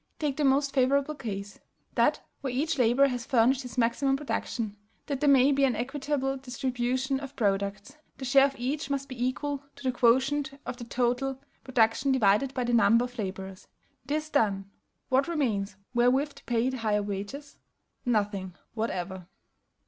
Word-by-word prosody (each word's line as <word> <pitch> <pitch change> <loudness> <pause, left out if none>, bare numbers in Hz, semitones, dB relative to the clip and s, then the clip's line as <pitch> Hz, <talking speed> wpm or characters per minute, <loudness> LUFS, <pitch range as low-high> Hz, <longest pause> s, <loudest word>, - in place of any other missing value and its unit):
Take 295 -3 -1
the 300 - 0
most 275 +1 +3
favorable 280 +2 +2
case, 200 -7 -6 0.3
that - - +2 0.2
where 270 -3 -2
each 295 +4 -1
laborer 250 +4 +4
has 245 -2 -3
furnished 250 +2 +3
his 250 -1 -9
maximum 260 +3 +2
production; 230 -6 -3 0.3
that 280 -3 -3
there 290 - +3
may 270 0 +6
be 275 0 +2
an 260 -4 +3
equitable 270 +2 -2
distribution 260 +1 -1
of 275 0 -8
products, 200 +4 -1 0.2
the 270 - -6
share 270 +2 +6
of 275 - -8
each 275 +4 -2
must 275 -1 -2
be 255 -2 -4
equal 280 +2 -2
to 280 - -13
the 260 - +1
quotient 270 +3 +2
of - - -5
the 240 - -7
total 250 +3 0 0.2
production 250 +2 +2
divided 245 +1 +3
by 255 - 0
the 240 0 -1
number 230 +1 +5
of 245 -1 -10
laborers. 190 -1 -5 0.4
This 305 +2 -2
done, 200 -6 +1 0.4
what 265 +1 +3
remains 220 - -1 0.2
wherewith 255 +4 +3
to - - -16
pay 240 +1 +1
the 260 - -4
higher 210 -3 0
wages? 205 +9 -6 0.5
Nothing 205 -6 -1 0.2
whatever. 190 -5 -3
255 Hz, 165 wpm, -28 LUFS, 225-275 Hz, 0.5 s, may